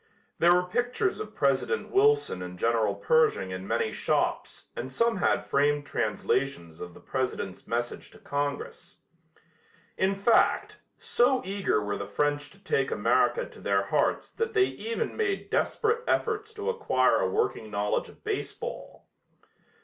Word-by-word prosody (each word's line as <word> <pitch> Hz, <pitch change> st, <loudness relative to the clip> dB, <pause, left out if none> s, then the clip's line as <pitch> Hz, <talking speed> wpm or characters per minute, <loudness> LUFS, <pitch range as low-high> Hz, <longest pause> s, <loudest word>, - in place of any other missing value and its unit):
There 175 Hz, +1 st, +6 dB
were 180 Hz, -, +3 dB
pictures 245 Hz, -, -1 dB
of 430 Hz, -, -7 dB
President 465 Hz, -, 0 dB
Wilson 430 Hz, -, +3 dB
and 90 Hz, 0 st, -7 dB
General 110 Hz, -1 st, +1 dB
Pershing 100 Hz, -3 st, +2 dB
in 95 Hz, +1 st, -6 dB
many -, -, 0 dB
shops -, -, -1 dB
and 130 Hz, +2 st, -5 dB
some 230 Hz, -, +1 dB
had -, -, +1 dB
framed 145 Hz, +1 st, +1 dB
translations 105 Hz, -, -2 dB
of 90 Hz, -1 st, -8 dB
the -, -, -12 dB
President's 130 Hz, -8 st, -4 dB
message 120 Hz, +1 st, -3 dB
to -, -, -16 dB
Congress. 145 Hz, 0 st, -4 dB, 1.0 s
In 190 Hz, +1 st, +2 dB
fact, 200 Hz, +4 st, +2 dB, 0.2 s
so 255 Hz, +2 st, +2 dB
eager 195 Hz, -, 0 dB
were 105 Hz, 0 st, -3 dB
the 100 Hz, -, -5 dB
French 145 Hz, +7 st, -1 dB
to 195 Hz, -, -19 dB
take 450 Hz, -, +1 dB
America -, -, +2 dB
to -, -, -14 dB
their -, -, +1 dB
hearts -, -, 0 dB
that 455 Hz, -1 st, -3 dB
they 380 Hz, -2 st, +5 dB
even 460 Hz, +3 st, -3 dB
made 400 Hz, -3 st, -2 dB
desperate 460 Hz, +1 st, +1 dB
efforts 435 Hz, -1 st, 0 dB
to 425 Hz, +2 st, -1 dB
acquire 470 Hz, -, +2 dB
a -, -, +1 dB
working 420 Hz, -, -1 dB
knowledge 105 Hz, 0 st, -1 dB
of -, -, -18 dB
baseball. -, -, -5 dB
160 Hz, 150 wpm, -28 LUFS, -, 1.0 s, There